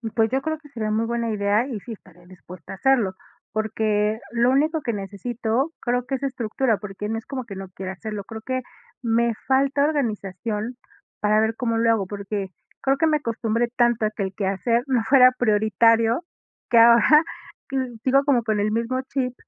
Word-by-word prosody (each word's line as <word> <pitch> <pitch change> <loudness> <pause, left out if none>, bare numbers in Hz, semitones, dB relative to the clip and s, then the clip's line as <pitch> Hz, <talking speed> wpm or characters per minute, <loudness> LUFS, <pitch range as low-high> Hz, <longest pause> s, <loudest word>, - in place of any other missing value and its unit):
Pues 225 -1 +3
yo 265 +1 +1
creo 315 +2 -3
que 300 -1 -17
sería 220 -5 -3
muy 220 +2 +1
buena 235 0 -2
idea 210 +3 +1
y 240 -6 -5
sí 230 +4 -8
estaré 180 -4 -17
dispuesta 180 -1 -12
a - - -6
hacerlo, 220 -4 +2 0.4
porque 215 0 0
lo 240 +1 +3
único 310 +4 +2
que 235 - -2
necesito 220 - -2
creo 245 0 -1
que 270 - -2
es 270 - -6
estructura, 245 -2 0
porque 205 +1 -6
no 225 - -1
es 225 - -8
como 265 -3 -5
que 205 -4 -8
no 190 -1 -7
quiera 190 0 -6
hacerlo, 210 +1 -6
creo 220 +2 -9
que 255 +3 -2 0.4
me 235 -1 +1
falta 275 +1 +2
organización 220 - -2 0.5
para 210 +1 +3
ver 220 +1 +1
cómo 230 -2 -1
lo 230 0 +2
hago, 215 -4 +1
porque 200 -1 -4 0.3
creo 270 0 +2
que 325 - +2
me 310 -1 +3
acostumbré 230 -3 -1
tanto 240 -3 +2
a 215 - 0
que 205 -2 -4
el 190 - -4
quehacer 210 +4 0
no 255 -3 +2
fuera 255 -2 +7
prioritario 225 - +3 0.5
que 235 - +4
ahora, 235 +7 +7 0.8
sigo 275 +2 +4
como 260 -5 +3
con 215 -2 0
el 210 +1 +1
mismo 230 +4 -1
chip, 255 -2 -1
230 Hz, 190 wpm, -23 LUFS, 210-255 Hz, 0.8 s, fuera